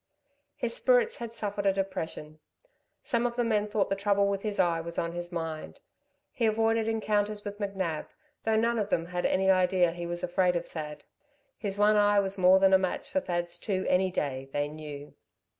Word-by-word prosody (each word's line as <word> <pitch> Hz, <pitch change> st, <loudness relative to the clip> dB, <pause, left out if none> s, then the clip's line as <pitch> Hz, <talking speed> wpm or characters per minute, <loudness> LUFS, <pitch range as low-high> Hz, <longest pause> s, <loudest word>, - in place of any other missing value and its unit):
His -, -, -2 dB
spirits -, -, +3 dB
had 235 Hz, -1 st, -6 dB
suffered 205 Hz, -3 st, -3 dB
a -, -, +6 dB
depression. 185 Hz, -5 st, -4 dB, 0.6 s
Some 235 Hz, 0 st, +1 dB
of 235 Hz, -, -6 dB
the 240 Hz, -, +1 dB
men 210 Hz, -2 st, +1 dB
thought 205 Hz, -1 st, 0 dB
the -, -, +3 dB
trouble 200 Hz, 0 st, +2 dB
with 200 Hz, -1 st, -1 dB
his 210 Hz, -1 st, -3 dB
eyes 165 Hz, -2 st, +2 dB
was 170 Hz, 0 st, -6 dB
on 170 Hz, -, -1 dB
his 175 Hz, +1 st, -5 dB
mind. 165 Hz, -2 st, -5 dB, 0.5 s
He 235 Hz, -4 st, +1 dB
avoided 225 Hz, 0 st, +2 dB
encounters 210 Hz, -1 st, 0 dB
with 205 Hz, 0 st, -6 dB
McNab, 190 Hz, -6 st, -3 dB, 0.4 s
though 220 Hz, 0 st, +1 dB
none 230 Hz, +1 st, +2 dB
of 205 Hz, -1 st, -1 dB
them 165 Hz, -, 0 dB
had 175 Hz, 0 st, -1 dB
any 190 Hz, 0 st, +3 dB
idea 185 Hz, -2 st, +3 dB
he 170 Hz, 0 st, -6 dB
was 175 Hz, 0 st, -3 dB
afraid 180 Hz, 0 st, +2 dB
of 170 Hz, -, -2 dB
Thad. 150 Hz, -2 st, -7 dB, 0.5 s
His 200 Hz, -2 st, -4 dB
one 210 Hz, +1 st, +4 dB
eye 205 Hz, 0 st, +4 dB
was 195 Hz, -1 st, -1 dB
more 185 Hz, 0 st, +6 dB
than 190 Hz, 0 st, +4 dB
a 190 Hz, -, +7 dB
match 185 Hz, -1 st, -3 dB
for 285 Hz, -, +2 dB
Thad's 175 Hz, -5 st, -3 dB
two 190 Hz, -1 st, -2 dB
any 185 Hz, +1 st, +3 dB
day, 135 Hz, -6 st, -3 dB
they 145 Hz, +1 st, 0 dB
knew. 150 Hz, -1 st, -9 dB
195 Hz, 200 wpm, -29 LUFS, 175-210 Hz, 0.6 s, a